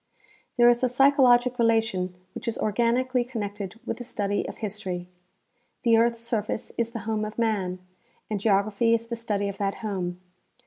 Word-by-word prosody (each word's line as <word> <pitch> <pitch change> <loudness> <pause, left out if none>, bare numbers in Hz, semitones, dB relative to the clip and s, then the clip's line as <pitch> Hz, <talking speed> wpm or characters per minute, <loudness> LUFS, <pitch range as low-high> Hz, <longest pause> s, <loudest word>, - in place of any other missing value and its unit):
There 240 0 +7
is 240 +1 +4
a 255 - +3
psychologic 250 -2 +4
relation 225 -6 +1 0.2
which 260 - -8
is 230 - -1
organically 240 +4 +1
connected 205 -4 -5
with - - -3
the 245 - -6
study 205 -4 -2
of - - -7
history. 195 -4 -4 0.8
The 230 -1 +5
earth's 230 0 +2
surface 225 -2 -3
is 235 -1 0
the 230 -2 -6
home 215 -1 -1
of 215 0 -5
man, 205 -6 0 0.5
and 210 -2 -2
geography 215 +3 +3
is 230 0 -3
the 235 0 -4
study 210 -3 -1
of 200 -1 -6
that 200 -1 0
home. 180 -4 -3
225 Hz, 170 wpm, -26 LUFS, 200-235 Hz, 0.8 s, There